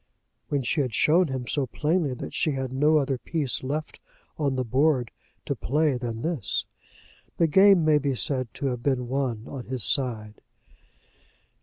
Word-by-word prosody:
When 140 -2 0
she 145 +5 0
had 125 -5 -2
shown 170 +3 +4
him 130 -3 -4
so 135 +1 -1
plainly 150 0 0
that - - -7
she 155 - 0
had 135 -1 -4
no 150 +4 +3
other 135 -3 0
piece 150 -4 -2
left 145 +4 -4 0.4
on 140 -3 -1
the 130 - 0
board 130 0 +1 0.3
to - - -1
play 150 +2 +1
than 120 -2 -5
this, 165 -5 -1 0.7
the 170 - +4
game 190 +1 +5
may 155 -1 +4
be 140 -2 -1
said 130 -2 -1
to 140 - -5
have 125 -3 -2
been 125 -2 0
won 130 -5 -2
on 135 -3 -7
his 130 -3 +1
side. 110 -5 +1
135 Hz, 170 wpm, -26 LUFS, 125-150 Hz, 0.7 s, game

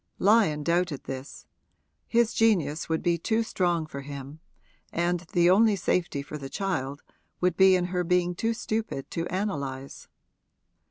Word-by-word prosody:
Lyon 195 -8 +3
doubted 170 -3 0
this: 135 +1 -7 0.6
his 235 0 +2
genius 165 -10 +1
would 160 0 -1
be 170 -1 +1
too 225 +6 +1
strong 175 -6 0
for 140 -3 -7
him, 140 +1 -8 0.5
and 175 +1 0
the 175 -1 +4
only 205 +3 +5
safety 170 -5 -1
for 150 +2 -7
the 135 -1 -7
child 145 -8 -3 0.4
would 180 -1 +1
be 190 0 +6
in 180 -1 +1
her 180 0 +1
being 180 0 +1
too 225 +6 -1
stupid 220 -11 -3
to 170 +1 -2
analyse. 140 -9 -4
175 Hz, 150 wpm, -27 LUFS, 145-190 Hz, 0.6 s, be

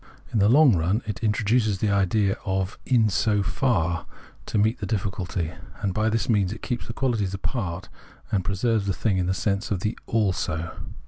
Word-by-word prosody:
In 110 - +2
the 100 +1 +5
long 135 -3 +6
run 90 +8 +1
it 105 +2 -5
introduces 110 0 +2
the 105 +2 0
idea 100 0 +2
of 95 0 -2
" - - -31
in 110 -2 +4
so 105 +2 +1
far 85 - 0 0.2
" - - -25
to - - -1
meet 110 +4 +2
the 100 - -4
difficulty; 95 -5 -2 0.3
and 95 -2 0
by 110 +2 +1
this 110 0 0
means 100 -5 +2
it 110 - -8
keeps 125 -3 -3
the 115 - -5
quahties 115 -8 0
apart, 95 -4 -3 0.4
and 95 -3 +1
preserves 100 +2 0
the 95 - +1
thing 100 -5 +1
in 90 - 0
the 95 - +2
sense 100 +1 -1
of 95 -4 -1
the 105 +4 -1
" - - -36
also." 90 -7 0
100 Hz, 205 wpm, -25 LUFS, 95-110 Hz, 0.4 s, long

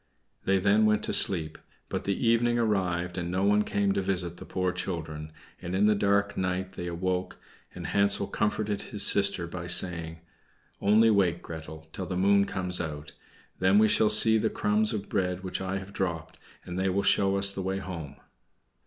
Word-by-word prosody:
They 95 0 +2
then 105 +3 +3
went 105 -1 +1
to - - -2
sleep; 80 -5 +3 0.3
but - - -5
the 100 +4 -1
evening 120 +1 +2
arrived 90 -6 -1
and 85 0 -4
no 95 +2 -1
one 105 +1 +3
came 100 -1 0
to 95 - 0
visit 90 -3 -3
the - - -10
poor 90 -1 -1
children, 80 -4 -5 0.3
and 90 0 -5
in 100 +2 +2
the 105 - +4
dark 100 0 0
night 95 0 -2
they 90 -2 -7
awoke, 90 +1 -3 0.4
and - - -7
Hansel 100 0 +2
comforted 105 0 -2
his 105 -2 +2
sister 100 -3 +2
by 85 0 -7
saying, 85 -3 +2 0.6
"Only 110 +3 +4
wait, 95 -5 +1
Gretel, 80 -1 -9
till 95 - -5
the 90 - -4
moon 100 +1 +3
comes 90 -2 -3
out, 75 -2 -7 0.5
then 95 +2 +3
we 110 +1 +5
shall 110 0 +3
see 110 +1 +6
the - - 0
crumbs 105 +1 0
of 105 -3 -4
bread 90 -1 -2
which 95 0 -4
I 95 +1 -3
have 95 +1 -9
dropped, 80 -4 -4 0.3
and 90 +1 -5
they 95 0 0
will 100 +2 -1
show 95 0 +2
us 100 0 +4
the 100 - -5
way 95 +1 -2
home." 85 -7 -7
95 Hz, 190 wpm, -27 LUFS, 90-100 Hz, 0.6 s, see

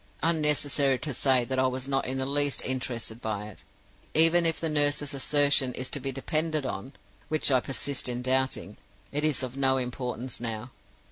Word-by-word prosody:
Unnecessary 150 -4 +3
to 145 +3 -4
say 130 -1 +2
that 130 +1 -2
I 130 - +3
was 130 +1 -4
not 135 -1 0
in 130 +1 -1
the 130 - -2
least 145 0 +2
interested 120 -3 -3
by 105 -1 -4
it. 75 -7 -13 0.5
Even 165 +2 +5
if 165 - 0
the 165 - -1
nurse's 145 -1 +1
assertion 140 -2 +3
is 130 0 -5
to 145 - -1
be 135 0 -2
depended 155 +2 -1
on 130 +3 -5 0.4
which 155 -1 +2
I 130 - +5
persist 135 +1 -3
in 125 0 -3
doubting 130 -6 0 0.3
it 145 +1 -2
is 155 -3 0
of 130 0 -5
no 135 -1 +2
importance 125 0 -4
now. 115 +1 -4
135 Hz, 185 wpm, -27 LUFS, 125-145 Hz, 0.5 s, Even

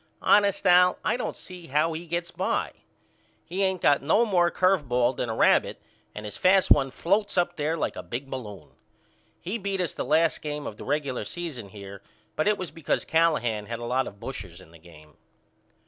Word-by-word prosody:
Honest 200 -1 +3
Al 180 0 +5
I - - +2
don't 250 - -4
see 180 -2 -10
how 150 +4 +1
he 165 +2 -7
gets 170 +1 -3
by. - - -1 0.7
He 180 +5 -4
ain't 190 -2 0
got 145 -1 +4
no 215 +11 +3
more 175 -5 +3
curve 185 -7 +1
ball 120 +1 +2
than 120 - -3
a 110 - -2
rabbit - - +3 0.4
and 105 - -7
his 105 - -6
fast 190 +1 +3
one 135 -2 +5
floats 200 +8 0
up 175 - +1
there 155 +2 -1
like - - -2
a - - -5
big 130 +4 -6
balloon. 105 - -8 0.7
He 205 +7 -4
beat 195 -1 -3
us 180 -3 -1
the - - -4
last 160 +4 +2
game 150 -1 -5
of 105 - -6
the - - -9
regular 140 -5 -2
season 130 - -6
here 100 0 -10 0.3
but 155 - 0
it 210 -1 +3
was 185 -3 -6
because 165 -3 -2
Callahan 120 -11 +1
had 115 - -4
a 120 - -7
lot 130 +2 0
of 100 - -10
bushers 95 -9 -8
in 85 -3 -16
the 85 - -16
game. 75 -3 -17
150 Hz, 205 wpm, -26 LUFS, 115-180 Hz, 0.7 s, Al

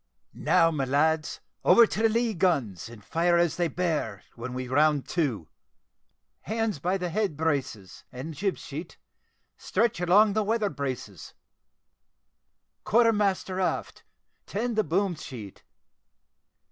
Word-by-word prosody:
"Now, 165 0 +3
my 145 -4 -1
lads, 155 +4 +1 0.2
over 235 - +7
to 215 - -3
the 225 - +4
lee 230 0 +1
guns, 140 - 0
and 110 -3 -13
fire 170 +1 +2
as 170 -2 +1
they 175 -1 +1
bear, 155 - -2
when 125 +2 -7
we 130 0 -4
round 145 +2 +2
to. 125 - -1 0.9
Hands 220 -5 -2
by 180 +6 0
the 180 - -4
lee - - -9
head 200 -8 -1
braces, 140 - -3
and 130 +6 -7
jib 195 +6 -2
sheet, 155 +5 -8 0.6
stretch 230 -6 0
along 200 +4 +5
the 215 - +1
weather 215 -1 0
braces. 130 - -6 1.5
Quarter 230 0 +4
master 195 -2 0
abaft, 185 - -2 0.4
tend 230 +3 -2
the 215 - +2
boom 185 +3 0
sheet. 120 - -9
165 Hz, 135 wpm, -27 LUFS, 135-200 Hz, 1.5 s, over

